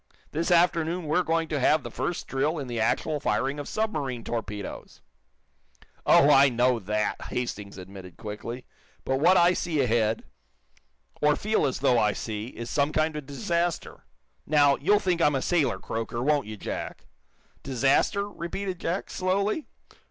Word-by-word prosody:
This 165 +4 -1
afternoon 170 0 +2
we're 155 +4 +2
going 165 -1 0
to 145 - -1
have 150 +4 +3
the - - -7
first 175 - -3
drill 145 +5 -1
in 140 - -4
the 120 -2 -4
actual 145 +7 0
firing 135 +5 -1
of 145 - -6
submarine 145 - -2
torpedoes." 105 -4 -6 1.1
"Oh, 145 - +6
I 140 0 +7
know 125 0 +2
that," 105 +1 -2
Hastings 105 -5 -4
admitted, 95 -1 -11
quickly. 115 +4 -7 0.4
"But 130 0 0
what 180 +5 +5
I 175 +1 +5
see 170 -4 -2
ahead, 115 -3 +1 1.0
or 150 0 +4
feel 215 -8 +1
as 130 - -3
though 120 -2 +4
I 105 -2 +2
see, 110 -1 -5
is 120 -2 -7
some 140 +2 +1
kind 155 0 0
of 150 -3 -6
disaster. 170 +2 -2 0.4
Now, 145 -2 +5
you'll 205 +8 +3
think 180 -4 0
I'm 150 -3 +4
a - - +1
sailor 140 - +1
croaker, 115 +4 -4
won't 145 -4 +1
you, 110 0 -7
Jack?" - - -6 0.6
"Disaster?" 140 - +1
repeated 185 -1 -5
Jack, 175 +3 -3
slowly. 200 +9 0
145 Hz, 160 wpm, -26 LUFS, 120-170 Hz, 1.1 s, I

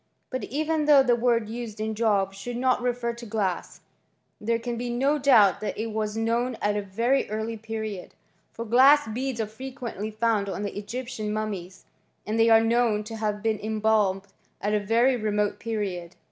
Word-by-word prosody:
But 255 - -3
even 310 +2 -1
though 290 -2 +7
tht 240 -2 +2
d 215 - -8
used 230 -3 -6
in 220 0 -2
Job 205 -3 +1
should 235 +5 -6
not 255 0 +2
refer 245 -1 -1
to 235 +1 -11
glass, 205 -4 -2 0.6
there 230 +2 0
can 235 +1 -4
QO 255 +5 0
doubt 230 -8 +5
that 215 - -3
it 225 +1 -3
was 215 0 -2
known 230 +2 0
at 205 0 0
a 210 - 0
very 230 +8 0
early 220 +2 -3
period; 220 -3 -6 0.4
glass 255 +5 +5
beads 250 +2 -3
are 220 - 0
frequently 235 -2 -6
found 215 -2 0
on 195 - -4
the 200 - -4
Egyptian 215 +1 -5
tnmieSy 200 -4 -4 0.4
and 220 +2 -1
they 225 0 +5
are 225 0 +7
known 225 -2 +2
to 225 +1 -7
have 210 -1 -2
bfden 220 -2 -1
embalmed 215 -3 +1 0.4
very 225 +5 +2
remote 210 -2 -1
period. 195 -6 -4
225 Hz, 170 wpm, -26 LUFS, 210-240 Hz, 0.6 s, though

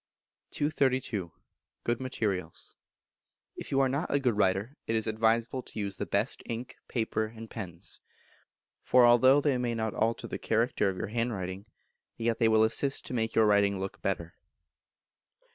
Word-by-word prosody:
232. 130 - 0 0.5
Good 120 0 0
Materials. 100 -10 -3 0.8
If - - -8
you 135 - +2
are 135 - +4
not 140 +6 -2
a 140 - +3
good 125 -5 +1
writer 100 +5 +1
it 115 - 0
is 110 - 0
advisable 115 +3 +1
to - - -13
use 100 -2 -3
the - - -3
best 100 +6 -1
ink, 120 +1 -5
paper, 110 -2 -1
and 115 +1 -10
pens. 90 -7 -8 0.8
For 125 -1 +6
although 130 +4 +6
they 140 -4 +1
may 120 -1 -1
not 110 -1 -2
alter 115 +1 0
the - - -5
character 115 -2 +1
of 95 - -4
your 90 - -4
handwriting, 105 -4 -3 0.5
yet 115 0 0
they 115 - +4
will 110 0 +5
assist 135 +5 +1
to - - -7
make 110 -2 -1
your 110 - +5
writing 100 -1 +3
look 95 0 -5
better. 85 -3 -2
115 Hz, 160 wpm, -29 LUFS, 100-125 Hz, 0.8 s, For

